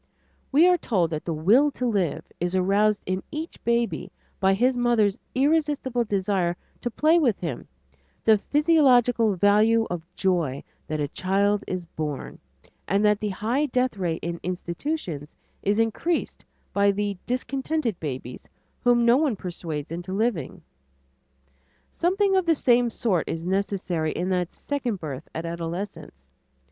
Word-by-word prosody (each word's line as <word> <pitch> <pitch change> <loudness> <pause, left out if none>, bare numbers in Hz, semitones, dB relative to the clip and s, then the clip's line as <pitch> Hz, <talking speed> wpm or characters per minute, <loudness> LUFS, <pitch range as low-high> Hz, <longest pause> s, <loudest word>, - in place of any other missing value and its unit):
We 310 +6 +6
are 360 -1 +4
told 180 - 0
that 155 -1 -4
"the 170 - -2
will 205 - +4
to 250 - -3
live" 200 -9 0
is 175 +2 -1
aroused 200 +3 +2
in 185 +1 -1
each 315 +2 -6
baby 235 0 0 0.3
by 190 0 +3
his 250 +5 +2
mother's 235 -5 +2 0.2
irresistible 280 -4 +1
desire 190 -4 0 0.2
to 240 - -2
play 310 +8 +3
with 245 - +2
him, 160 -9 -5 0.6
the 220 -2 +5
physiological 250 - +3
value 215 +4 +4
of 175 -2 -2
joy 170 -8 0 0.2
that 155 0 -2
a 145 - 0
child 200 +4 +1
is 185 -2 -3
born, 150 -4 -5 0.5
and 200 +4 +2
that 210 -1 +3
the 210 - -2
high 230 +9 0
death 250 -2 0
rate 175 -4 -2
in 170 0 -3
institutions 180 - -4 0.3
is 205 +1 +1
increased 225 +10 -1 0.3
by 200 0 +4
"the 200 0 -1
discontented 260 - -2
babies" 130 -4 -6 0.3
whom 240 -1 +4
no 235 +2 +6
one 285 -6 +1
persuades 165 -5 -5
into 175 +2 -5
living. 205 - -1 1.3
Something 385 +3 +2
of 375 -2 +2
the 330 - +4
same 245 -3 +3
sort 205 -7 0
is 165 +1 -4
necessary 185 -4 -1
in 180 +2 -2
that 180 -2 -1
second 250 -8 -3
birth 150 -3 -7
at 165 +1 -3
adolescence. 165 - -6
205 Hz, 145 wpm, -25 LUFS, 175-245 Hz, 1.3 s, We